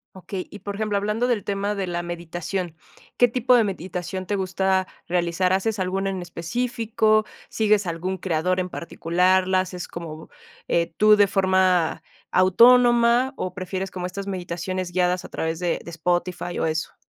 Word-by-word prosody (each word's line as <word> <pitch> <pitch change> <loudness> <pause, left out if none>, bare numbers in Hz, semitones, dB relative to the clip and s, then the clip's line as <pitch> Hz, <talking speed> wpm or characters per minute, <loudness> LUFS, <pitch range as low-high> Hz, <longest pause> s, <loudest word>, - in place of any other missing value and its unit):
Okey, 190 0 -6
y 205 - -10
por 200 +1 -6
ejemplo, 210 -1 -1
hablando 210 +4 0
del 230 -5 0
tema 200 +1 -2
de 195 -1 -2
la 175 -1 -3
meditación, 175 +1 -4 0.4
¿qué 245 - +6
tipo 250 +1 +3
de 235 - +5
meditación 185 -1 -4
te 205 - -1
gusta 190 0 0 0.2
realizar? 180 +1 +1
¿Haces 205 +3 0
alguna 190 +1 -1
en 190 -2 -3
específico? 215 +4 0 0.2
¿Sigues 215 -2 +2
algún 180 +2 -3
creador 180 +1 0
en 185 - -2
particular? 180 +2 +1
¿La 185 0 +3
haces 180 -1 -4
como, 160 -2 -8 0.4
eh, 170 0 +1
tú 215 0 +6
de 205 -1 +5
forma 185 -3 +2 0.3
autónoma, 240 +6 +5
o 185 - -3
prefieres 185 0 -4
como 180 -1 -5
estas 195 +2 -5
meditaciones 180 0 -4
guiadas 180 0 +1
a - - -9
través 160 +1 -3
de 175 -2 -1
de - - -9
Spotify, 175 +1 -2
o - - +1
eso? 155 0 -2
185 Hz, 165 wpm, -23 LUFS, 175-205 Hz, 0.4 s, qué